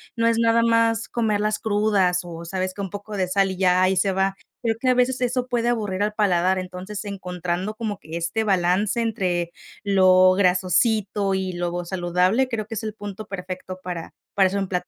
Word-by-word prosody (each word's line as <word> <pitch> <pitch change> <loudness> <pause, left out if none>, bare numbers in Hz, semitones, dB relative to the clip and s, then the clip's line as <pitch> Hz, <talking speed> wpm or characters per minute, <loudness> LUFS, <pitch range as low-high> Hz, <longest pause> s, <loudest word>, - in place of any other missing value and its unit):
no 230 - 0
es 230 0 +3
nada 230 0 +3
más 230 -1 +2
comerlas 215 -2 0
crudas 205 -4 +2
o, 170 -1 -8
¿sabes 185 +1 -3
qué?, 200 - -6
un 195 - -4
poco 205 +2 -7
de 185 -2 0
sal 195 +1 +2
y 185 - -7
ya 185 -1 +4
ahí 190 0 +2
se 195 +1 +2
va. 190 +1 +1 0.3
Creo 225 -1 +1
que 255 - -2
a - - +5
veces 250 +1 +1
eso 250 0 0
puede 240 -1 0
aburrir 205 -5 -1
al 210 - -1
paladar, 185 -3 +2
entonces, 185 +3 -6
encontrando 180 0 -4
como 215 -2 -3
que 160 -2 -9
este 175 +7 -1
balance 190 +3 +1
entre 180 -7 -1 0.3
lo 185 -2 +5
grasosito 195 +2 +2
y 190 -1 -1
lo 175 0 -2
vo 175 0 -3
saludable, 180 +7 +1
creo 220 -3 -3
que 225 - -6
es 215 - -4
el 215 -1 -4
punto 205 0 -7
perfecto 185 -1 -6
para 175 -2 -6 0.2
para 195 -1 +5
eso 195 +2 -2
en 195 - -2
plato. 180 -1 -2
195 Hz, 205 wpm, -23 LUFS, 185-215 Hz, 0.3 s, a